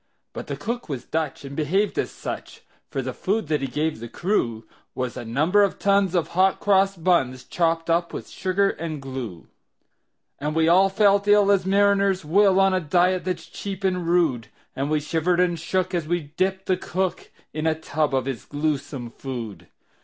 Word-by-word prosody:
But - - -7
the - - -4
cook 235 -4 -4
was 130 -4 -4
Dutch, 155 -3 -3
and 140 0 -7
behaved 185 +8 0
as - - -1
such; - - -7 0.3
For - - -3
the - - -4
food 200 -4 -1
that 150 -2 +1
he 135 - -1
gave 150 +1 -2
the 115 +1 -7
crew 115 - -1 0.3
Was 125 -2 -3
a - - -5
number 155 - +2
of 200 -2 +2
tons 200 -2 +2
of 170 - +1
hot 185 +2 +2
cross 195 -1 +3
buns, 150 -8 +1
Chopped 165 -1 0
up 170 +1 +1
with - - -6
sugar 195 +1 0
and 160 -2 -5
glue. 130 -10 -6 0.9
And 150 +2 -2
we 160 0 +3
all 185 +3 +5
felt 200 0 +3
ill 205 -1 +5
as 190 -2 +2
mariners 200 -2 +3
will, 195 +4 +4
On 195 0 +4
a 185 - +2
diet 180 +3 +2
that's 185 -1 -3
cheap 195 -1 -7
and 180 -3 0
rude; 160 -10 +2 0.3
And 135 +2 -2
we 155 0 +2
shivered 165 +4 0
and 175 -2 +2
shook 185 +3 -1
as 170 -3 -1
we 160 -3 -2
dipped 190 +1 0
the 185 - +1
cook 185 +1 -3 0.2
In 155 +1 -1
a 160 - +2
tub 150 -2 -1
of 130 -1 0
his 135 -4 -4
gluesome 145 -4 -3
food. 120 -6 -7
170 Hz, 190 wpm, -24 LUFS, 145-190 Hz, 0.9 s, all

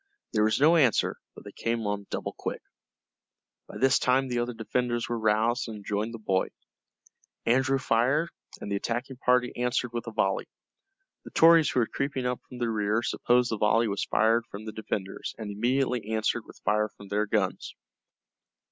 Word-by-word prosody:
There 105 -1 +3
was 110 +2 +2
no 160 +4 +6
answer, 130 -8 +3 0.2
but - - -12
they - - -9
came 115 -1 -2
on 100 -1 -3
double - - -4
quick. - - -5 1.0
By - - -9
this 135 0 +4
time 130 +1 +2
the 120 -1 0
other 120 0 -2
defenders 120 +1 -1
were 120 -1 -2
roused, 110 +3 +1
and 110 -2 -6
had 100 - -13
joined 105 +2 -1
the 115 - -6
boy. 95 -4 0 1.0
Andrew 130 +3 +3
fired, 130 +6 +1 0.3
and 100 - -6
the - - +1
attacking 120 +5 -3
party 125 -1 +2
answered 125 0 -1
with 120 0 -4
a - - -4
volley. 95 -3 0 0.8
The - - -10
Tories 165 -1 +6
who 125 - +2
were - - +2
creeping 140 +1 -3
up 125 0 -1
from 125 - -9
the 120 -2 -1
rear 105 +1 0
supposed 120 0 +2
the 110 - -1
volley 115 +2 +3
was 100 -2 -1
fired 115 +2 +2
from 105 +2 -8
the 110 - -5
defenders, 105 -3 -5
and 110 -2 -5
immediately 120 +1 0
answered 110 +1 -1
with - - -15
fire 105 +1 +2
from 100 -1 -14
their 105 +1 0
guns. 100 -3 -1
115 Hz, 185 wpm, -28 LUFS, 105-125 Hz, 1.0 s, no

